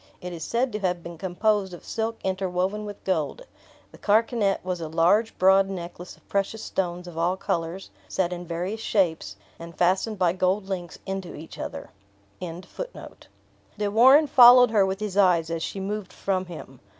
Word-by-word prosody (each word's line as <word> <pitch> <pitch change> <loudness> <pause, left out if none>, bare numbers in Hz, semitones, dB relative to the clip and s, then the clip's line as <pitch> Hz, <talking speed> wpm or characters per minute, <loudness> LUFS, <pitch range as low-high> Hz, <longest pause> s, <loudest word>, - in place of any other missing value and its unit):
It 180 0 -7
is 165 -2 -6
said 245 +2 0
to 210 - -3
have 180 -3 -1
been 170 -1 -9
composed 190 +1 0
of - - -15
silk 225 0 -3
interwoven 190 +2 -1
with 205 -1 -9
gold. 185 - -1 0.5
The - - -16
carkanet 215 -2 +1
was 180 -2 -3
a 160 - -4
large 175 +8 +2
broad 190 +1 +5
necklace 180 -1 -7
of - - -29
precious 200 +2 -2
stones 180 -1 -3
of 165 -2 -7
all 175 +3 +1
colors, 170 +1 -3 0.2
set 180 -2 0
in 175 0 -7
various 180 +6 -3
shapes, 165 - 0 0.2
and 170 0 -10
fastened 190 +5 +1
by 180 -2 +2
gold 185 +2 0
links 180 -4 -5
into 190 -2 -5
each 160 +2 -11
other. - - -6 0.5
De 200 - -8
Warenne 260 +8 +7
followed 250 -4 +8
her 200 -3 +4
with 190 +1 -3
his 205 -2 -3
eyes 175 -4 +3
as 165 -1 -2
she 195 - -4
moved 200 0 -4
from 185 -2 -2
him. 145 -7 -10
190 Hz, 175 wpm, -25 LUFS, 175-210 Hz, 0.5 s, followed